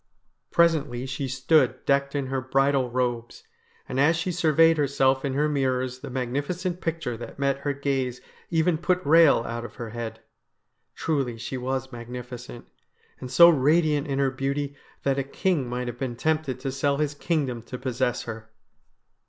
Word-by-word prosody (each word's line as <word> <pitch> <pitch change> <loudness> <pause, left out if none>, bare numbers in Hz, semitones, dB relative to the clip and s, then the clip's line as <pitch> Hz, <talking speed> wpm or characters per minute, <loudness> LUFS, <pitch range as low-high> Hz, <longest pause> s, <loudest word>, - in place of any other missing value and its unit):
Presently 150 -7 +2
she 135 +1 -3
stood 135 +5 +2
decked 140 0 +1
in 140 -2 0
her 130 0 -2
bridal 135 0 +2
robes, 120 -1 -2 0.4
and 130 - -3
as 155 +4 +4
she 175 +3 -2
surveyed 165 -1 +4
herself 135 -2 +2
in 135 -2 -2
her 150 +2 +2
mirrors 130 -3 -1
the - - -8
magnificent 145 +9 -3
picture 165 -7 -2
that 120 - -9
met 140 0 0
her 145 +1 -1
gaze 135 -3 -2 0.3
even 160 0 +2
put 180 +1 +1
Eehel 150 -5 +5
out 115 0 -4
of 120 - -9
her 115 -2 -6
head. 115 -1 -5 0.8
Truly 135 -7 -1
she 120 +3 -5
was 130 +1 -3
magnificent, 120 0 -8 0.5
and 130 - -7
so 170 +7 +8
radiant 150 0 +3
in 135 -1 -2
her 135 -1 +2
beauty 140 +2 -2 0.3
that 140 0 +1
a - - 0
king 140 -1 -1
might 125 +1 -3
have 120 0 -6
been 130 -3 -3
tempted 155 -2 -1
to 135 - -2
sell 140 +1 0
his 150 -1 0
kingdom 145 -6 -1
to 125 +2 -8
possess 125 -1 -1
her. 110 -1 -8
135 Hz, 170 wpm, -25 LUFS, 125-150 Hz, 0.8 s, so